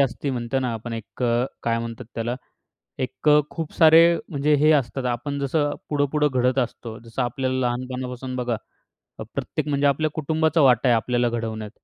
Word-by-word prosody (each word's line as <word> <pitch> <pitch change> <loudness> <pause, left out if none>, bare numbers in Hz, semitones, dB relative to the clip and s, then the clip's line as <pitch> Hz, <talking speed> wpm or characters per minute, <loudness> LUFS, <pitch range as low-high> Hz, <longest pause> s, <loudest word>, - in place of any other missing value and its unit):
असते 140 +1 0
म्हणतो 120 0 -2
ना, 125 -2 -1
आपण 115 +1 -6
एक 115 +2 -7
अ, 120 0 +2 0.2
काय 115 0 0
म्हणतात 115 +1 -6
त्याला 120 +1 -2 0.7
एक 140 +4 -1
अ, 150 0 +7
खूप 160 -3 -6
सारे 160 0 +7 0.3
म्हणजे 145 0 +1
हे 155 - +6
असतात. 135 -3 +1
आपण 135 +4 -2
जसं 145 +1 0 0.2
पुढं-पुढं 150 0 +1
घडत 125 +1 +2
असतो. 115 -2 -4
जसं 115 0 -5
आपल्याला 130 +2 -1
लहानपणापासून 125 +1 -4
बघा 125 -2 -1 0.6
अ, - - -5
प्रत्येक - - -3
म्हणजे 145 0 +1
आपल्या 155 +3 +2
कुटुंबाचा 160 +1 +1
वाटा 125 -1 +4
आहे 120 - +5
आपल्याला 120 +2 +1
घडवण्यात. 110 -2 -4
130 Hz, 170 wpm, -23 LUFS, 120-145 Hz, 0.7 s, अ